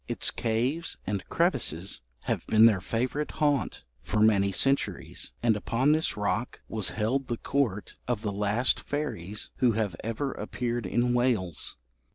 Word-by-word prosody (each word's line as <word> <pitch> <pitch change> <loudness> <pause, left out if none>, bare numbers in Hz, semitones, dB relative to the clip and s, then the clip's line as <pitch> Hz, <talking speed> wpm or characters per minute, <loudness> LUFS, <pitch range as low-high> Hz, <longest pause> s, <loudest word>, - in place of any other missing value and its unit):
Its - - 0
caves 125 +9 -1
and 100 -2 -2
crevices 115 - +1 0.2
have - - -2
been 110 +1 +6
their 105 -5 +5
favourite 125 +9 -1
haunt 145 - 0 0.2
for 105 - -1
many 100 -2 +4
centuries, 135 +8 0
and 115 -2 +4
upon 120 +7 +1
this 155 -5 +1
rock 105 +3 -1
was 110 -3 +3
held 125 +6 -1
the 120 - -2
court 115 -8 -1
of 120 -4 -1
the 105 - -1
last 105 +5 +2
fairies 105 - -3
who 125 -3 +3
have 105 -5 -1
ever 115 +5 -2
appeared 120 -3 -3
in 120 +5 +1
Wales. 115 - 0
115 Hz, 150 wpm, -28 LUFS, 105-130 Hz, 0.2 s, been